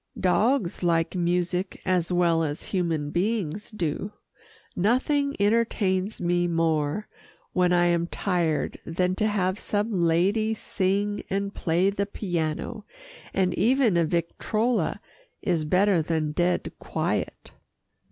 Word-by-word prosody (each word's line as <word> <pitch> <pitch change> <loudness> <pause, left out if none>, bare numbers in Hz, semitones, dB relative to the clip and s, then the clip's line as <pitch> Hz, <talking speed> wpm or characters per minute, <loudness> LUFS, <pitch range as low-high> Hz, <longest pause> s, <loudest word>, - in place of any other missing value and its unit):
Dogs 205 +2 +1
like 165 -2 +1
music 180 +1 -1
as 180 -2 +1
well 170 -2 +3
as 150 +1 -3
human 165 -6 0
beings 200 0 -1
do. 195 -1 -3 0.6
Nothing 280 +8 +1
entertains 205 -2 +1
me 175 0 +1
more 165 +2 0 0.5
when 180 -1 +3
I 175 0 +4
am 170 -1 +2
tired 175 -5 -1
than 180 +2 0
to 215 - +2
have 190 -2 0
some 210 +2 -1
lady 195 +5 +2
sing 205 +1 -1
and 200 +1 -2
play 175 +3 +1
the 200 0 -2
piano, 175 +2 -3 0.5
and 185 -2 +1
even 240 0 +3
a 170 - +4
victrola 215 +8 0 0.4
is 165 -4 0
better 185 +2 +3
than 155 -1 -1
dead 175 +3 0
quiet. - - -3
180 Hz, 120 wpm, -26 LUFS, 170-205 Hz, 0.6 s, I